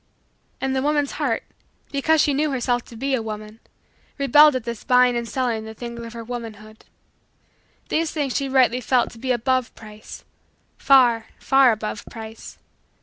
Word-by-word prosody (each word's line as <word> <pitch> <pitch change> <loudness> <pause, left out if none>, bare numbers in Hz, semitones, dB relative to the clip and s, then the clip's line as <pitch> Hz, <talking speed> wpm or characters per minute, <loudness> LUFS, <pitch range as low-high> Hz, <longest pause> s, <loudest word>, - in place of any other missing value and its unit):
And 265 0 -1
the 265 - 0
woman's 290 0 0
heart, 275 -7 -2 0.5
because 310 +3 +2
she 290 - +2
knew 300 +2 +1
herself 245 -2 -1
to 235 - -13
be 270 +4 -2
a 255 - +1
woman, 215 0 -7 0.6
rebelled 295 +1 +6
at 255 - -2
this 235 -2 -6
buying 250 -1 +4
and 235 -1 -3
selling 240 -4 -1
the 220 0 -9
things 235 0 -7
of 230 0 -9
her 230 -1 -7
womanhood. 220 -2 -9 1.0
These 325 0 0
things 285 -5 -2
she 275 -1 -1
rightly 255 -2 +3
felt 245 0 +1
to 230 - -14
be 255 +2 -2
above 255 +1 0
price 215 -1 -12 0.6
far, 240 -5 +4
far, 270 -2 +4
above 215 -1 -4
price. 220 -1 -10
245 Hz, 165 wpm, -22 LUFS, 225-270 Hz, 1.0 s, rebelled